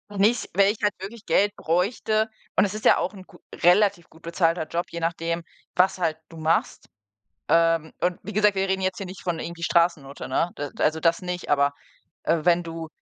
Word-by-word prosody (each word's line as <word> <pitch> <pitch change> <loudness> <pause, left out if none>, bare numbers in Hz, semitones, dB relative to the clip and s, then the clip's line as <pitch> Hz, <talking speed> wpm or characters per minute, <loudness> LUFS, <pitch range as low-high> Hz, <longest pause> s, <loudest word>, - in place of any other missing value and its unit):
Und 205 -1 -7
nicht, 225 +4 +2
wenn 200 +1 +4
ich 215 - -7
halt 210 - +3
wirklich 205 +4 -9
Geld 205 +1 +2
bräuchte. 215 +5 0 0.3
Und - - +4
es 200 - -3
ist 215 - -7
ja - - +7
auch 185 - -2
'n 190 -2 -11
gu - - -18 0.2
relativ 180 -1 +3
gut 160 - -19
bezahlter 165 -1 0
Job, 170 +1 -2
je 170 - -5
nachdem, 165 0 -2 0.3
was 185 +1 +3
halt 165 -3 0
du 165 - -12
machst. 160 +1 0 0.6
Ähm, 165 -1 +3
und 180 0 0
wie 210 - -7
gesagt, 210 -1 +3
wir 195 0 0
reden 190 0 0
jetzt 185 -1 0
hier 195 - -5
nicht 185 +1 -10
von 175 -2 -2
irgendwie 170 +1 -7
Straßennutte, 165 -5 0
ne? 170 - 0
D 145 -1 -4
also, 160 +1 +2
das 165 0 +2
nicht, 180 -1 -4
aber, 140 0 +3 0.5
äh, 165 0 +1
wenn 175 0 +4
du 165 -1 -7
175 Hz, 210 wpm, -25 LUFS, 165-195 Hz, 0.6 s, ja